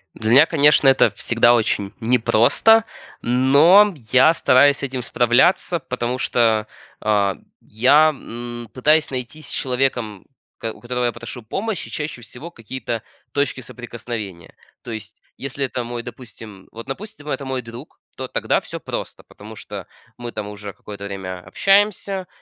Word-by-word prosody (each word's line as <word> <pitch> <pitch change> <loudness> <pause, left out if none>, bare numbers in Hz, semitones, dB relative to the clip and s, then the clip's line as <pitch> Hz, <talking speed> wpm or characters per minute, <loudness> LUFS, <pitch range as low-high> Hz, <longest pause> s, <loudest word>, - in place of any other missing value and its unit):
Для 110 - -3
меня, 140 +6 +8
конечно, 150 -3 +4
это 135 - +4
всегда 120 0 +3
очень 105 -3 0
непросто, 120 - +4 0.4
но 145 - +5 0.2
я 130 +5 +6
стараюсь 140 -2 +4
с - - -8
этим 130 -2 -3
справляться, 125 +10 +2
потому 125 -3 -3
что, 110 -4 +1 0.3
а, 100 -3 +1 0.3
я, 140 +8 +4
м, 120 -4 -7
пытаюсь 150 +4 +3
найти 130 +4 -6
с - - -10
человеком, 125 -6 -2 0.3
у - - -77
кот 110 -1 -4
у - - -17
которого 125 0 -2
я 120 - +1
прошу 125 - -8
помощи, 195 - -4
чаще 150 -5 -5
всего 125 +9 -10
какие-то 115 -2 -5 0.3
точки 140 -2 -1
соприкосновения. 115 -7 -8 0.3
То 120 - -8
есть, 110 -1 -8 0.2
если 140 +1 -3
это 125 -1 -4
мой 120 0 -6
допустим, 110 -5 -11
вот, 115 +1 -9
допустим, 150 0 -8
это 140 - -3
мой 130 -1 -3
друг, 115 +5 -12 0.2
то - - -5
тогда - - 0
всё - - -8
просто, - - -6
потому 110 +2 -13
что - - -9 0.3
мы 120 -1 -6
там 105 -1 -5
уже 105 -1 -8
какое-то 100 -1 -10
время 95 -2 -6
общаемся 195 - +1
125 Hz, 155 wpm, -21 LUFS, 110-140 Hz, 0.4 s, меня